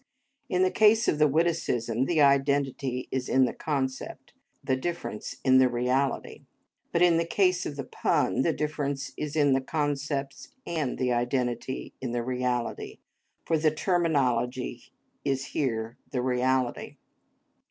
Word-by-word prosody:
In 180 0 +2
the 185 - +2
case 220 +1 +4
of 150 - +1
the 150 - +6
witticism 135 -7 0
the 160 0 +2
identity 140 -2 +2
is 130 -1 -2
in 130 0 +4
the - - -2
concept, 135 -4 -4 0.3
the 130 - +1
difference 170 -5 -4
in 130 0 +6
the 130 -1 +5
reality, 125 +3 -1 0.4
but 170 - +3
in 170 -2 +5
the 165 - +2
case 180 +1 +1
of 145 - -6
the 140 - -4
pun - - 0
the - - +2
difference 145 -2 -3
is 150 0 -4
in 145 -3 +4
the 135 - +2
concepts 145 -1 -3
and 155 -7 -2
the 125 -1 +1
identity 120 +1 -2
in 125 -2 -3
the 120 -1 -1
reality, 125 -1 -2 0.5
for 160 -2 +1
the 155 0 +4
terminology 130 -8 0 0.3
is 135 -1 -1
here 120 -4 -2
the 125 -2 -2
reality. 130 0 0
135 Hz, 145 wpm, -27 LUFS, 125-155 Hz, 0.5 s, the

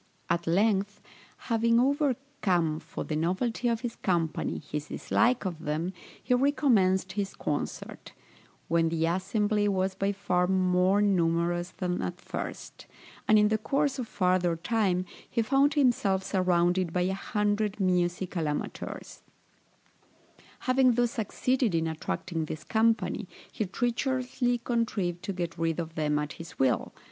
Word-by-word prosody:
At 170 0 0
length, 200 +3 +2 0.4
having 230 0 +2
overcome, 255 - +1
for - - -6
the 155 - -3
novelty 190 +10 0
of 230 -1 0
his 240 -2 -4
company, 175 -9 -1
his 150 0 -5
dislike 240 -1 +1
of 175 -4 -3
them, 160 +5 -2 0.3
he 250 - +1
recommenced 235 -9 +3
his 195 0 -3
concert, 145 - -4 0.6
when 165 0 +2
the 165 0 0
assembly 205 +4 +1
was 190 -1 0
by 195 +1 0
far 180 -3 0
more 185 +1 +3
numerous 175 -2 +1
than 180 -1 -3
at 175 0 -4
first; - - -7 0.4
and 215 - +6
in 210 0 +5
the 220 0 +1
course 275 +3 0
of 245 - -3
farther 180 -3 +1
time, 185 0 0 0.2
he 230 - 0
found 275 +5 +3
himself 230 -9 +2
surrounded 180 -2 +1
by 180 - 0
a 185 +2 +1
hundred 210 +1 -1
musical 180 -2 0
amateurs. 150 - -5 1.4
Having 255 -1 +4
thus 240 0 +1
succeeded 240 -1 0
in 165 0 +1
attracting 160 +1 -3
this 155 0 -6
company, 225 0 +1 0.2
he 215 - -2
treacherously 245 +3 0
contrived 225 -7 -1
to 200 - -4
get 175 -3 -4
rid 165 0 0
of 165 -1 -4
them 150 -2 0
at 150 0 -2
his 165 0 -10
will. 130 -3 +1
190 Hz, 140 wpm, -28 LUFS, 175-230 Hz, 1.4 s, and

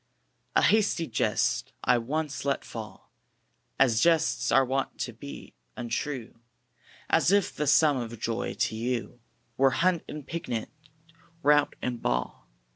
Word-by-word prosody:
A - - +4
hasty 205 -5 +3
jest 115 -7 0
I 125 - +4
once 145 +4 -3
let 140 -1 -1
fall 110 -3 -9 0.7
As 120 -5 +4
jests 165 -2 +2
are 135 -1 +5
wont 135 +1 -2
to 120 - -3
be, 140 +5 -10 0.2
untrue 120 0 -4 0.7
As 165 +2 +3
if 200 -1 +2
the 150 - -1
sum 145 0 +5
of 115 -2 -5
joy 115 0 -2
to - - 0
you 120 +1 -3 0.4
Were 135 0 +5 0.2
hunt 185 -3 +3
and 150 -2 -7
picnic, 120 -11 -4 0.7
rout 145 0 +4
and 120 -2 -3
ball. - - -2
135 Hz, 135 wpm, -28 LUFS, 115-155 Hz, 0.7 s, are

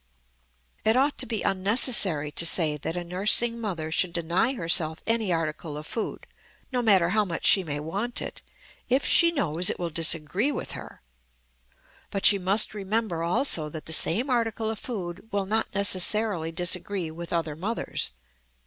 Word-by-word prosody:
It 220 +3 +2
ought 280 +2 0
to - - +2
be 220 -2 -3
unnecessary 190 - +3
to 160 - +2
say 165 -2 +2
that 160 +4 -6
a 175 - -4
nursing 210 +6 +1
mother 165 -7 -5
should 175 +1 0
deny 170 +9 0
herself 165 -4 0
any 225 -4 +1
article 155 -2 -4
of 150 - -8
food, 225 +6 -5 0.5
no 250 -1 -1
matter 195 -7 +3
how 215 +3 +1
much 170 -5 -5
she 190 - +6
may 145 -3 -4
want 200 +11 -3
it, - - -8 0.5
if 260 +3 +1
she 335 - +7
knows 180 - +1
it - - -1
will 170 -2 -5
disagree 165 - +1
with - - -6
her; - - -10 1.1
but 195 - -4
she 200 - +6
must 195 +5 +4
remember 210 -3 -3
also 170 - +1
that 155 0 -9
the 160 - 0
same 220 - +3
article 225 -3 -2
of 220 - -6
food 190 -3 -7
will 200 -1 -2
not 220 +3 -1
necessarily 200 -3 +2
disagree 180 +1 -1
with 170 +1 -9
other 165 -3 -3
mothers. 205 +9 -4
185 Hz, 165 wpm, -25 LUFS, 165-220 Hz, 1.1 s, she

